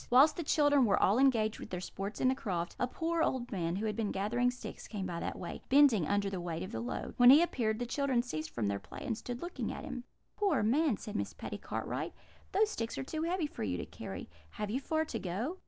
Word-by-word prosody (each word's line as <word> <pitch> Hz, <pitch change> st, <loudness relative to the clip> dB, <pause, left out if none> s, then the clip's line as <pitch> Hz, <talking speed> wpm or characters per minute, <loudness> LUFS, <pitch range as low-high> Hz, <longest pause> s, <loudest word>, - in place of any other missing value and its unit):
"Whilst 270 Hz, +5 st, +7 dB
the -, -, -3 dB
children 290 Hz, -3 st, +4 dB
were 200 Hz, -, +3 dB
all 205 Hz, +6 st, +4 dB
engaged 225 Hz, -5 st, +3 dB
with -, -, -8 dB
their 180 Hz, -, -3 dB
sports 195 Hz, +3 st, -5 dB
in -, -, +3 dB
the -, -, +3 dB
croft, 180 Hz, -10 st, -3 dB
a 250 Hz, -, +2 dB
poor 330 Hz, +5 st, -1 dB
old 255 Hz, -6 st, 0 dB
man, 170 Hz, -3 st, -1 dB
who 205 Hz, +3 st, -2 dB
had 215 Hz, -, -1 dB
been 225 Hz, -3 st, -1 dB
gathering 235 Hz, +6 st, +1 dB
sticks, 245 Hz, 0 st, -7 dB
came 200 Hz, -3 st, -4 dB
by 175 Hz, -2 st, -3 dB
that -, -, -3 dB
way, -, -, -6 dB
bending 260 Hz, -, +6 dB
under 205 Hz, 0 st, +1 dB
the 190 Hz, -2 st, -3 dB
weight 170 Hz, 0 st, -3 dB
of 185 Hz, -, -6 dB
the -, -, -3 dB
load. 240 Hz, -, -4 dB
When 245 Hz, 0 st, +8 dB
he 290 Hz, +6 st, +9 dB
appeared, 225 Hz, -10 st, 0 dB
the 245 Hz, -, -2 dB
children 260 Hz, -1 st, +1 dB
ceased 155 Hz, -10 st, -4 dB
from 115 Hz, -, -2 dB
their 100 Hz, 0 st, 0 dB
play, -, -, -9 dB
and 235 Hz, -5 st, 0 dB
stood 245 Hz, +4 st, -6 dB
looking 350 Hz, +1 st, -3 dB
at -, -, -6 dB
him. 255 Hz, -4 st, -5 dB, 0.3 s
"'Poor 400 Hz, -, +2 dB
man!' 265 Hz, +2 st, +3 dB
said 210 Hz, -, -7 dB
Miss -, -, -2 dB
Patty -, -, -6 dB
Cartwright, -, -, -3 dB, 0.4 s
'those 425 Hz, +2 st, +3 dB
sticks 230 Hz, -, -3 dB
are -, -, -2 dB
too 310 Hz, +3 st, -4 dB
heavy 340 Hz, 0 st, 0 dB
for 295 Hz, -, -7 dB
you 90 Hz, -4 st, -1 dB
to 85 Hz, -, -4 dB
carry. -, -, -7 dB, 0.3 s
Have 210 Hz, -1 st, -3 dB
you 255 Hz, -, 0 dB
far 315 Hz, +3 st, 0 dB
to 235 Hz, -7 st, -4 dB
go?' 215 Hz, -, -3 dB
240 Hz, 255 wpm, -33 LUFS, 200-280 Hz, 0.4 s, he